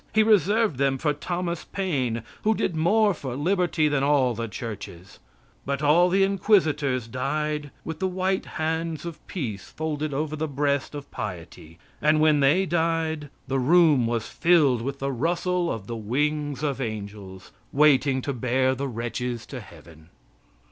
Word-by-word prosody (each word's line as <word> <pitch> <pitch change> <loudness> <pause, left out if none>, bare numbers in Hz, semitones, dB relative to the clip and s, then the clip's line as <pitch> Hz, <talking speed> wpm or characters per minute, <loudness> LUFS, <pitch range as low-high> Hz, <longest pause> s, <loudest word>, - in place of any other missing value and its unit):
He 220 - +6
reserved 215 - +3
them 135 0 +1
for 150 +2 0
Thomas 175 +3 -3
Paine, 130 - -2 0.2
who 220 +1 +2
did 175 - -1
more 205 +6 +3
for 130 -6 -6
liberty 175 0 +1
than 145 -2 +1
all 140 -3 +3
the 115 0 -4
churches. 100 -4 -8 0.4
But 140 +1 -3
all 170 +5 +5
the 195 +2 +3
inquisitors 155 - +2
died 150 +4 -2 0.2
with 160 -1 -5
the 190 - +1
white 185 +1 -1
hands 160 +1 -2
of 170 -2 -7
peace 110 - -5
folded 155 -1 -3
over 150 +2 -2
the 160 +1 -2
breast 140 0 -1
of 145 -1 -8
piety. 85 -4 -7 0.2
And 155 +1 +3
when 155 -1 +4
they 150 +8 +4
died, 160 -3 -1 0.2
the 135 0 0
room 150 -3 +4
was 115 -1 -2
filled 155 -9 +3
with 135 +3 -4
the 140 0 -2
rustle 175 +6 0
of 110 -4 -5
the 115 - -5
wings 145 +6 -1
of 140 -3 -1
angels, 100 -4 -6 0.2
waiting 140 -2 +3
to 140 - -2
bear 130 +2 +1
the 135 +2 -3
wretches 120 0 -4
to 130 - -7
Heaven. 80 -5 -15
145 Hz, 160 wpm, -25 LUFS, 125-165 Hz, 0.4 s, He